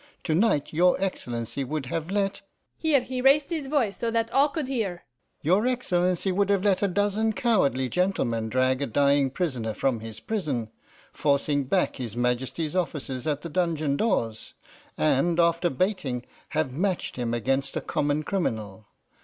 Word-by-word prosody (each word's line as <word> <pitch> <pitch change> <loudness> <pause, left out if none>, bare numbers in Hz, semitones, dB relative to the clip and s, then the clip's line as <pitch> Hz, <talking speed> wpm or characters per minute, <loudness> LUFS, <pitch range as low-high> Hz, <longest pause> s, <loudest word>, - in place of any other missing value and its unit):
To 160 - 0
night 165 -6 +2
your 180 +3 +4
Excellency 120 - -3
would 150 +1 -3
have 160 +5 -3
let' 200 0 -1 0.3
here 305 -5 +3
he 255 0 -4
raised 280 +4 +4
his 310 -5 -2
voice 265 -8 +1
so 235 - -2
that 230 0 0
all 280 +4 +4
could 290 -1 -3
hear 215 -10 -2 0.4
'your 190 - +3
Excellency 185 -7 +1
would 200 +2 +1
have 200 -2 +2
let 200 -3 +2
a 200 - +3
dozen 205 +3 +1
cowardly 185 - +2
gentlemen 125 -10 0
drag 130 +2 +1
a 140 - 0
dying 140 +2 +3
prisoner 130 - -2
from 130 -4 0
his 110 0 -8
prison, 150 - -2 0.4
forcing 145 -1 +1
back 185 +8 +1
his 120 -4 -5
Majesty's 125 +6 -1
officers 145 -7 -2
at 150 -1 -1
the 170 - -5
dungeon 155 -4 0
doors, 120 - -1 0.4
and, 140 - +2
after 170 +1 +3
baiting, 135 - -1 0.2
have 155 -4 -1
matched 180 +6 -1
him 120 -1 -1
against 135 +4 -1
a - - +1
common 145 +1 0
criminal. 110 - -3
165 Hz, 160 wpm, -26 LUFS, 130-200 Hz, 0.4 s, your